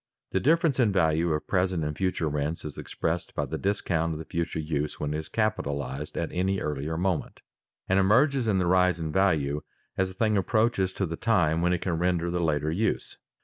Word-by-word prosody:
_ - - -58
The - - +1
difference 155 -2 +2
in 115 -5 +4
value 85 -2 +2
of 75 0 -1
present 90 -3 0
and 75 0 -2
future 95 -3 -1
rents 75 +2 -2
is 75 - -6
expressed 85 +1 -3
by - - 0
the - - -4
discount 85 -5 0
of - - -5
the 80 - -7
future 85 0 -3
use 75 -1 -2
when 75 0 -2
it 75 - -1
is 80 - -8
capitalized 70 - -2
at 85 - -2
any 95 +2 0
earlier 75 +2 -3
moment, 90 -1 -2 0.5
and 95 +1 +3
emerges 125 +6 +3
in 100 -3 +2
the 90 - +1
rise 90 -1 +3
in 80 -1 -3
value 75 -6 +1 0.4
as 95 - +3
the 95 - -10
thing 110 0 +2
approaches 105 -1 +1
to 95 - -1
the 80 -1 -5
time 85 -8 +2
when 90 +1 +2
it 90 - 0
can 85 -3 -1
render 85 -1 +1
the 90 0 -1
later 75 -2 +1
use. 105 +7 -1
85 Hz, 215 wpm, -27 LUFS, 80-95 Hz, 0.5 s, in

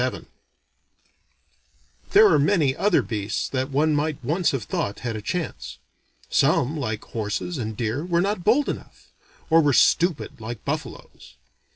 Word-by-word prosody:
VII - - -3 1.8
There 415 +2 +7
are - - +4
many 145 -4 +2
other 195 0 +2
beasts 105 -2 -3
that 130 0 -2
one 150 +3 +2
might 150 0 0
once 165 +7 +1
have 135 -5 -2
thought 100 0 -3
had 120 -3 -3
a 110 - -5
chance. 105 - -4 0.5
Some, 140 +6 +2
like 110 -7 -3
horses 115 +9 -4
and 110 -2 -4
deer, 120 +5 -2
were 170 -1 0
not 195 0 -1
bold 245 +9 +3
enough; - - -7 0.4
or 165 0 +7
were 145 -2 +2
stupid, 165 -4 +2
like 115 0 -7
buffaloes. - - -6
145 Hz, 150 wpm, -24 LUFS, 115-170 Hz, 1.8 s, There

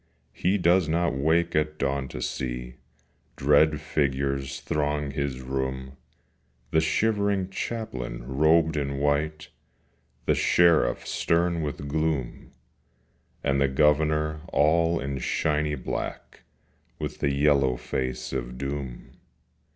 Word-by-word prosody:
He 95 +3 +1
does 90 -2 +3
not 85 0 +1
wake 80 +5 +1
at 75 0 0
dawn 70 -1 -1
to 60 -1 -6
see 60 0 -4 0.6
Dread 75 +2 +4
figures 70 -1 -1
throng 75 -1 -1
his 70 -2 -3
room, 65 0 -3 0.8
The 80 - +4
shivering 100 +3 +1
Chaplain 65 - -4
robed 80 +4 +3
in 70 -1 -2
white, 75 +2 0 0.8
The - - +3
Sheriff 85 -8 +3
stern 85 0 +1
with 70 -1 -4
gloom, 75 -4 -2 0.9
And 70 -1 +1
the 70 - +4
Governor 75 +2 +2
all 85 +3 +3
in 70 0 -3
shiny 75 +4 0
black, 65 - -5 0.6
With - - -5
the 70 - +1
yellow 70 -3 +3
face 65 +1 -3
of 60 -1 -4
Doom. 70 -2 -5
75 Hz, 110 wpm, -26 LUFS, 65-80 Hz, 0.9 s, Dread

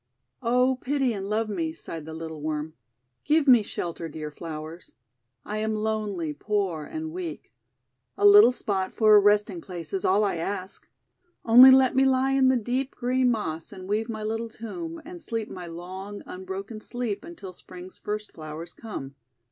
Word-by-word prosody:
"Oh, 250 +2 +2
pity 270 -2 0
and 195 -1 -5
love 220 +1 0
me," 170 -6 -2
sighed 165 -1 -8
the 160 - -7
little 160 -2 -7
Worm. 155 0 -3 0.5
''Give 300 0 +2
me 245 -4 +8
shelter, 170 -4 -5
dear 150 0 -6
Flowers. 160 +2 -8 0.5
I 210 +1 -3
am 220 0 -1
lonely, 210 -7 -2
poor, 185 -2 -2
and 315 0 -5
weak. 345 -1 -6 0.7
A - - +2
little 410 -9 +9
spot 195 -6 -2
for 215 -2 +5
a - - +9
rest 205 +1 +3
ing 340 - -7
place 175 - -8
is 190 - -1
all 200 +3 +3
I 195 -4 0
ask. 185 +3 -5 0.6
Only 245 +3 +10
let 260 -1 +6
me 265 - +5
lie 265 0 +3
in 270 -1 +4
the 260 -1 +4
deep, 250 +4 -2
green 255 +1 +1
Moss, 165 -9 -2
and 185 -2 -9
weave 215 +3 -1
my 220 -1 -4
little 225 +2 -2
tomb, 330 +10 -7
and 350 +1 -9
sleep 225 -5 -4
my 180 -1 -7
long, 185 +4 -8
unbroken 190 +4 -7
sleep, 240 -2 -4
until 320 - -9
Spring's 180 +1 -12
first 210 0 -4
flowers 160 +1 -8
come. 140 -12 -7
210 Hz, 175 wpm, -26 LUFS, 175-250 Hz, 0.7 s, Only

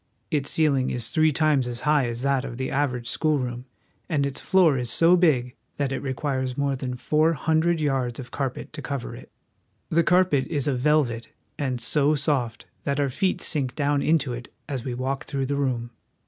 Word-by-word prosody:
Its 145 -3 0
ceiling 140 -5 +2
is 120 -2 -1
three 155 -1 +3
times 150 -4 +2
as 120 -1 -4
high 150 -4 +2
as 120 +1 -5
that 135 -1 +1
of 120 -3 -6
the 130 0 -3
average 130 -4 -1
schoolroom, 125 -5 -1 0.4
and 145 -4 +1
its 140 - -4
floor 180 -6 +4
is 125 -2 -1
so 165 +9 +5
big 135 -9 +2 0.2
that 140 -2 -1
it 135 - -2
re 130 -2 -3
quires 130 -3 -2
more 140 -1 0
than 125 -1 -4
four 155 +5 +2
hundred 160 +3 +1
yards 135 -5 -1
of 125 - -8
carpet 135 0 -4
to 155 - -6
cover 140 -2 -5
it. - - -13 0.6
The 170 - +3
carpet 180 -6 +3
is 145 -4 -1
of 130 -3 0
velvet, 130 -5 +1 0.3
and 130 -4 -1
so 145 +5 +2
soft 135 -6 -1 0.2
that 140 0 -1
our 140 -2 +1
feet 185 +8 0
sink 135 -4 0
down 145 -1 +1
into 150 -5 +1
it 125 +1 -8 0.2
as 135 -5 -4
we 125 -2 -4
walk 135 +2 -3
through 135 -1 -2
the 140 +2 -1
room. 125 -4 -1
140 Hz, 200 wpm, -25 LUFS, 125-150 Hz, 0.6 s, so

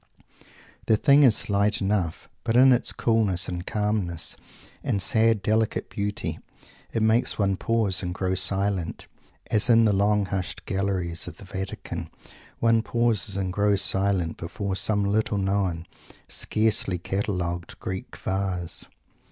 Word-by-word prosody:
The 110 - +4
thing 140 +4 +5
is 125 -6 +6
slight 100 +1 +1
enough; 95 -5 -1 0.2
but 115 - +1
in 130 +1 +7
its 120 - +2
coolness, 105 -6 +1
and 90 0 -5
calmness, 105 -6 -1 0.5
and 100 - 0
sad 110 +2 +3
delicate 110 0 0
beauty, 105 0 -3 0.5
it 115 - 0
makes 110 +2 +2
one 100 -2 +1
pause 110 -2 0
and 90 -2 -3
grow 95 0 -1
silent, 95 -1 -1 0.5
as 110 +3 +3
in 115 -1 +6
the 105 - +3
long 100 +1 +2
hushed 95 -1 -4
galleries 95 -3 -2
of - - -8
the 100 - -12
Vatican 95 -3 -6 0.5
one 115 -1 +3
pauses 115 -4 0
and 95 -2 -2
grows 100 0 +2
silent 95 -4 0
before 100 +3 -4
some 105 +1 +1
little 105 +1 +1
known, 95 -4 -1 0.4
scarcely 110 -4 +1
catalogued 90 -2 -3
Greek 95 0 -6
Vase. 95 -3 -3
100 Hz, 135 wpm, -25 LUFS, 95-110 Hz, 0.5 s, in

